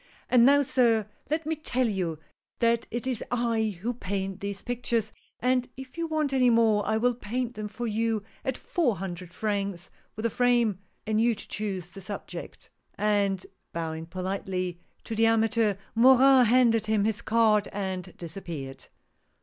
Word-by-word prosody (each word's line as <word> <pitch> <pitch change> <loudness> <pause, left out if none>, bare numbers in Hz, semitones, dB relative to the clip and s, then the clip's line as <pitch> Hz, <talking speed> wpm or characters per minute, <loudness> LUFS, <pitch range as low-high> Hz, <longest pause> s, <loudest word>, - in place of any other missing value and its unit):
" - - -31
And 245 -1 +7
now, 285 +1 +6
sir, 235 -5 +2 0.2
let 310 +1 -1
me 320 +1 0
tell 255 -5 0
you 180 -7 -2 0.4
that 235 0 +2
it 240 +2 -4
is 255 -3 -2
I 225 -4 0
who 240 +2 0
paint 195 -3 -3
these 200 0 -5
pictures, 235 -3 -1 0.3
and 250 +1 +1
if 265 -1 -10
you 335 0 -2
want 310 -3 0
any 255 -2 +4
more 225 -3 +4
I 220 - +2
will 245 +2 +2
paint 245 +1 -3
them 215 -2 -5
for 220 +4 -5
you 225 -1 0 0.2
at 265 -4 -2
four 280 - 0
hundred 180 -1 -6
francs 200 -3 -3 0.2
with 215 - -6
the 230 - +1
frame, 240 -5 +2 0.3
and 215 0 +1
you 235 0 +3
to - - -10
choose 190 -5 -4
the 195 - -11
subject;" 200 +2 -8 0.2
and 200 -2 +1 0.3
bowing, 160 -1 -4
politely, 185 -1 -3 0.2
to 230 - -5
the 225 +1 +3
amateur, 225 -2 +2 0.2
Morin 260 +1 +6
handed 230 -2 +4
him 215 -2 +2
his 220 +1 -1
card, 220 -2 +3
and 190 -2 -4
disappeared. 155 -6 -7
220 Hz, 165 wpm, -27 LUFS, 195-245 Hz, 0.4 s, And